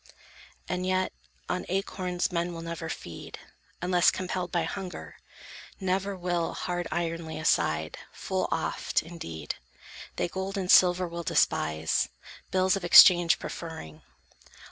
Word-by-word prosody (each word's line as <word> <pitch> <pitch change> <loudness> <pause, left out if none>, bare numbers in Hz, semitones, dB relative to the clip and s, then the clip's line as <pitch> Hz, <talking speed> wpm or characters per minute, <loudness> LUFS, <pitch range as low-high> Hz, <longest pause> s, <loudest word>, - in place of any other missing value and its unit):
And 180 - -2
yet, 185 0 0 0.3
on - - -2
acorns 185 -1 -1
men 170 0 -2
will 165 - -7
never 165 -1 -5
feed, 85 - -7 0.5
Unless 180 0 +4
compelled 185 -1 -3
by 170 -2 +1
hunger; 180 +2 -6 0.6
never 190 +1 -1
will 175 -2 -1
Hard 175 -1 -3
iron 170 -1 -2
lay 160 - -6
aside. 80 - 0
Full - - -2
oft, - - -1
indeed, 155 - -7 0.6
They - - 0
gold 190 +2 -4
and 185 -2 +1
silver 180 0 +6
will 170 0 -5
despise, 80 - +1 0.4
bills 185 +1 +2
of 195 - -4
Exchange 175 -1 +8
preferring. 160 - -8
175 Hz, 125 wpm, -28 LUFS, 165-185 Hz, 0.6 s, Exchange